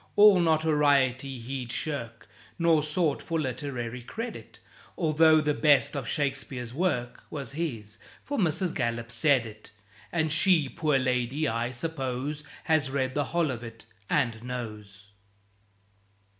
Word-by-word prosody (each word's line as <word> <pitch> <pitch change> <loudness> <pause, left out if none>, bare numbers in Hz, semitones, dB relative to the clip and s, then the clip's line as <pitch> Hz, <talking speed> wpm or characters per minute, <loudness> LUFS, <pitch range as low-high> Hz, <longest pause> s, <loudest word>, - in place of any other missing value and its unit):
All 205 -2 +8
notoriety 145 -5 +2
he'd 125 0 -5
shirk, 115 -6 -4 0.3
Nor 165 -3 +4
sought 155 0 0
for 165 -1 -2
literary 125 -3 -4
credit, 230 - -7 0.4
Although 160 -1 +5
the 150 -1 +1
best 145 -2 +3
of 135 -4 -3
Shakespeare's 135 -3 -3
work 130 -7 -1
Was 140 -4 -5
his. 115 -9 -4 0.2
(For 285 -2 -3
Mrs. 175 -1 +1
Gallup 115 -2 -2
said 125 +1 +3
it, 110 -1 -11 0.4
And 160 -2 +1
she, 165 -3 +4
poor 150 -2 +1
lady, 130 +3 0
I 115 0 -1
suppose, 135 +1 -3 0.2
Has 155 -4 +2
read 130 -1 -1
the 145 0 0
whole 165 0 0
of 120 -2 -6
it, 115 -1 -10 0.2
and 120 -6 +1
knows.) 105 -5 -7
140 Hz, 130 wpm, -28 LUFS, 120-155 Hz, 0.4 s, All